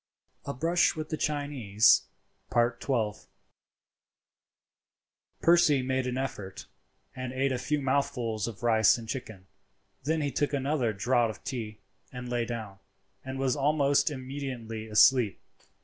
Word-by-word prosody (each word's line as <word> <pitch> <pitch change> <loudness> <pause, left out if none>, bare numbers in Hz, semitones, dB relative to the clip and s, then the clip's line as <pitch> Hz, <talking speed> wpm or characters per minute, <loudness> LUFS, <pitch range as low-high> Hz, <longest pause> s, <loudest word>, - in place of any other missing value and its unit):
A 140 - -3
BRUSH 170 +7 +2
WITH 155 -1 -5
THE 155 - -1
CHINESE.—XII. 120 -3 0 2.1
Percy 170 -5 +5
made 130 0 -1
an 125 0 -2
effort, 105 -8 -5 0.5
and 130 -1 -5
ate 135 +1 0
a 125 - -1
few 150 +3 -1
mouthfuls 130 -6 -1
of 115 -1 -8
rice 110 -2 +4
and 115 -1 -9
chicken, 110 -5 -6 0.6
then 160 +3 0
he 145 -1 -1
took 145 +3 -1
another 135 -3 0
draught 115 +4 +1
of 110 - -9
tea, 110 -5 -5 0.3
and 125 -1 -7
lay 120 -1 -1
down, 110 -5 -6 0.4
and 130 0 -6
was 135 -1 +1
almost 145 0 +2
immediately 130 -5 -6
asleep. 110 0 +4
130 Hz, 125 wpm, -28 LUFS, 115-140 Hz, 2.1 s, Percy